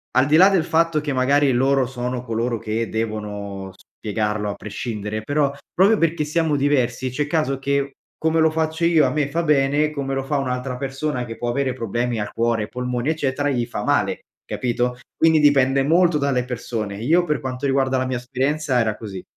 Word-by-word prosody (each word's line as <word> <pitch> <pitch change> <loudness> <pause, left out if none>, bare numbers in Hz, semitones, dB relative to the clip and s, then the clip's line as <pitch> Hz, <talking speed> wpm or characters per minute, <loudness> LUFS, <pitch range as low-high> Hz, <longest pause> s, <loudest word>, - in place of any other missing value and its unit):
al 130 - +5
di 150 - +3
là 190 +3 +8
del 190 -5 +2
fatto 165 -2 +2
che, 145 -1 -2
magari 140 +2 +3
loro 135 +1 +2
sono 125 -1 -4
coloro 115 0 -2
che 115 0 -2
devono 105 -3 -4
spiegarlo 105 0 -3
a - - -6
prescindere, 110 0 -5
però 145 +2 +1 0.2
proprio 200 +4 +4
perché 165 -2 +1
siamo 155 0 +1
diversi, 130 -3 +1
c'è 145 +3 -1
caso 150 -3 0
che, 140 0 -1 0.3
come 160 0 +1
lo 160 0 +4
faccio 160 +1 -1
io 160 -4 +4
a - - +2
me 150 -2 0
fa 165 +4 -1
bene, 145 0 +2
come 140 -2 -3
lo 135 - -2
fa 145 +1 -1
un'altra 125 -1 -2
persona, 135 0 -3
che 115 -1 -8
può 120 0 -3
avere 130 +1 0
problemi 120 0 -2
al 105 - -4
cuore, 115 -1 +1
ai - - -7
polmoni, 125 +2 -2
eccetera, 145 -2 0
gli 120 -3 0
fa 120 - -5
male, - - +1 0.3
capito? 125 0 -1 0.2
Quindi, 160 -1 +4
dipende 135 -2 +4
molto 170 +2 +3
dalle 135 -3 +1
persone. 115 -4 -4
Io, 165 +9 +3
per 150 -3 0
quanto 130 0 -4
riguarda, 135 -1 +1
la 130 - 0
mia 130 -1 -2
esperienza 135 +3 -1
era 110 -2 0
così. 95 -4 -7
135 Hz, 195 wpm, -22 LUFS, 120-150 Hz, 0.3 s, là